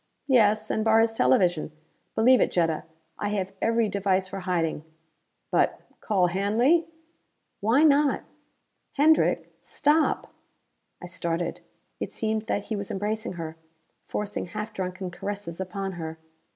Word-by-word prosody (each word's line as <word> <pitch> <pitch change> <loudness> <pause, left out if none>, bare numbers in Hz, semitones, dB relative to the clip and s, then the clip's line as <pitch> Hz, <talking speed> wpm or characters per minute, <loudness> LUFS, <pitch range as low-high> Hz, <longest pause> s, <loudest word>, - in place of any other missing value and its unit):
"Yes, 215 -5 +3
and 220 - 0
bar 220 0 +5
his 225 0 +3
television. 165 - +2 0.4
Believe 250 +3 +5
it, - - +3
Jetta. 165 -3 0 0.3
I 205 - -1
have 195 -2 -2
every 230 0 +2
device 195 -2 0
for 195 +1 -6
hiding. 170 -4 -1 0.7
But - - +2 0.2
call 190 -4 +2
Hanley!" 225 - +2 0.7
"Why 225 +8 +3
not?... 290 -2 +4 0.7
Hendrick, 310 +2 +3
stop!" 300 +2 +1 0.7
I - - -5
started. 170 -1 -2 0.4
It - - -4
seemed 220 0 -2
that 200 - -1
he 220 - -4
was 200 -1 -4
embracing 215 +2 -2
her; 165 -2 -6 0.5
forcing 205 -3 -3
half 210 +5 -5
drunken 185 0 -4
caresses 195 -2 -5
upon 195 +1 -4
her. 160 -3 -6
200 Hz, 130 wpm, -26 LUFS, 180-225 Hz, 0.7 s, bar